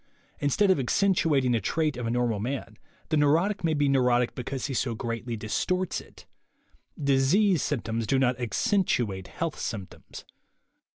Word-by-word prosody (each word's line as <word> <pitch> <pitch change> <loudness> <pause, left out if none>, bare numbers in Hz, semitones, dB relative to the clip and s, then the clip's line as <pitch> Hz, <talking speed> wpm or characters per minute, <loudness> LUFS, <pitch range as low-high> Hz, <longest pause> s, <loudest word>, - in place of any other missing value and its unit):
Instead 165 +8 +2
of 185 - +2
"accentuating" 145 -3 +2
a 115 - +1
trait 155 +7 0
of 120 -1 -4
a - - -1
nor 120 +1 +1
mal 110 -3 -1
man, 120 -1 -4 0.3
the 155 - +2
neurotic 165 +8 +2
may 160 -2 +1
be 145 0 +2
a - - +2
neurotic 125 -2 +2
because 130 +1 -4
he 140 - -3
so 120 -2 -1
greatly 115 +1 -4
distorts 180 - -1
it. - - -17 0.7
Disease 145 +6 +3
symptoms 115 -5 -2
do 135 - +2
not 130 -1 +1
"accentuate" 120 - 0
health 165 -2 -4
symptoms. 100 -5 -7
135 Hz, 160 wpm, -27 LUFS, 120-155 Hz, 0.7 s, Disease